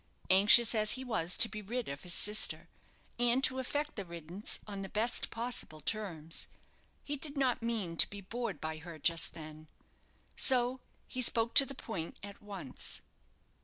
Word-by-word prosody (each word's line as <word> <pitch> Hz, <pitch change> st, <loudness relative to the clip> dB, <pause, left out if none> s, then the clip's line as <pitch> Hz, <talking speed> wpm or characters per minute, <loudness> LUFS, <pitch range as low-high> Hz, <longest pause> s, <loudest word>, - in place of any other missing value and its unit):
Anxious 210 Hz, +5 st, +7 dB
as 215 Hz, -2 st, +3 dB
he 260 Hz, -, -5 dB
was 180 Hz, -9 st, 0 dB
to -, -, +5 dB
be 215 Hz, -1 st, -8 dB
rid 235 Hz, +4 st, -5 dB
of 140 Hz, +1 st, -7 dB
his 175 Hz, -2 st, +2 dB
sister, 210 Hz, +1 st, +3 dB, 0.5 s
and 245 Hz, +2 st, +2 dB
to 260 Hz, 0 st, +3 dB
effect 290 Hz, +3 st, -3 dB
the 200 Hz, -, -5 dB
riddance 170 Hz, +3 st, -4 dB
on 200 Hz, -2 st, -6 dB
the 195 Hz, -, -7 dB
best 225 Hz, +4 st, +1 dB
possible 230 Hz, -9 st, -2 dB
terms, 165 Hz, -3 st, -3 dB, 0.6 s
he 290 Hz, -, -4 dB
did 290 Hz, +1 st, -7 dB
not 260 Hz, -3 st, 0 dB
mean 220 Hz, -7 st, -3 dB
to -, -, +3 dB
be 205 Hz, -, -8 dB
bored 235 Hz, +5 st, -5 dB
by 160 Hz, 0 st, -5 dB
her 165 Hz, 0 st, -10 dB
just 165 Hz, +2 st, +1 dB
then. 155 Hz, -1 st, -11 dB, 0.7 s
So 255 Hz, -1 st, +3 dB, 0.3 s
he 255 Hz, -, -5 dB
spoke 230 Hz, -1 st, +2 dB
to 275 Hz, -, +7 dB
the 275 Hz, -, -8 dB
point 180 Hz, -10 st, -6 dB
at 200 Hz, 0 st, -10 dB
once. 195 Hz, -10 st, -6 dB
210 Hz, 170 wpm, -32 LUFS, 170-245 Hz, 0.7 s, Anxious